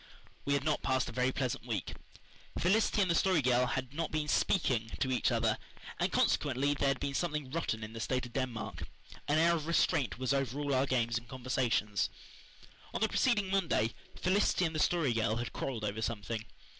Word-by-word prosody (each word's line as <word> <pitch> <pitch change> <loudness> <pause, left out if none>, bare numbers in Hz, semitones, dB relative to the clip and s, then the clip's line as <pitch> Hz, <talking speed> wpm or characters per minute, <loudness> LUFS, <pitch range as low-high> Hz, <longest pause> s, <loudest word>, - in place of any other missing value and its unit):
We 140 - +2
had 140 - 0
not 155 0 0
passed 130 -1 0
a - - -6
very 130 +1 +1
pleasant 130 -2 -3
week. 110 -6 -3 0.6
Felicity 205 +2 +3
and 180 - +1
the - - +4
Story 180 -3 +3
Girl 125 0 +3
had 130 0 -3
not 165 +1 -2
been 155 -1 -1
"speaking" 125 - +1
to 130 - 0
each 125 +1 +2
other, 115 -2 +1 0.4
and - - +1
consequently 140 +3 +2
there 140 0 0
had 135 0 +1
been 140 - -2
something 150 -4 -2
rotten 125 -9 -2
in 110 +1 -7
the 115 - -6
state 125 +2 -1
of 120 - -11
Denmark. 110 -10 -3 0.4
An 150 - +3
air 170 +2 +5
of 160 -2 -2
restraint 145 -8 +2
was 130 +2 0
over 135 0 -1
all 145 -1 -1
our 130 +1 +2
games 120 -3 +1
and 120 - -19
conversations. 120 -5 0 0.9
On - - 0
the 220 - +3
preceding 210 -7 +2
Monday 165 - +1 0.3
Felicity 185 -1 +2
and 160 - -1
the 155 - -2
Story 155 -6 +2
Girl 110 -1 +1
had 120 +1 -4
quarrelled 115 -5 -3
over 105 +1 -3
something. 110 0 -3
130 Hz, 200 wpm, -32 LUFS, 115-155 Hz, 0.9 s, air